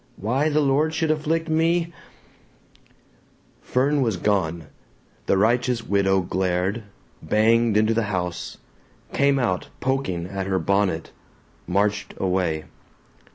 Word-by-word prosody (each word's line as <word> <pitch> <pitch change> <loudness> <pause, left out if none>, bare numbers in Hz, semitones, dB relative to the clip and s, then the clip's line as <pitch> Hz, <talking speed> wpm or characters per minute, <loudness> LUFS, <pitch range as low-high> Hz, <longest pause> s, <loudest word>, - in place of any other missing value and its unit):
Why 130 +9 0
the 155 0 +2
Lord 150 +3 +1
should 160 -1 +1
afflict 160 +2 -1
me 165 +2 +1 0.8
" - - -34
Fern 140 +3 +1
was 115 -7 0
gone. 85 -5 0 0.6
The 95 - +3
righteous 120 +3 +1
widow 95 -2 +2
glared, 95 +4 -1 0.4
banged 115 0 +3
into 110 +1 +3
the 115 0 0
house, 90 -3 -3 0.6
came 140 0 +3
out 105 -8 -1
poking 130 -11 -1
at 95 +1 -4
her 95 -1 +1
bonnet, 95 -1 0 0.6
marched 100 +3 0
away. 90 -4 0
105 Hz, 115 wpm, -23 LUFS, 95-135 Hz, 0.8 s, The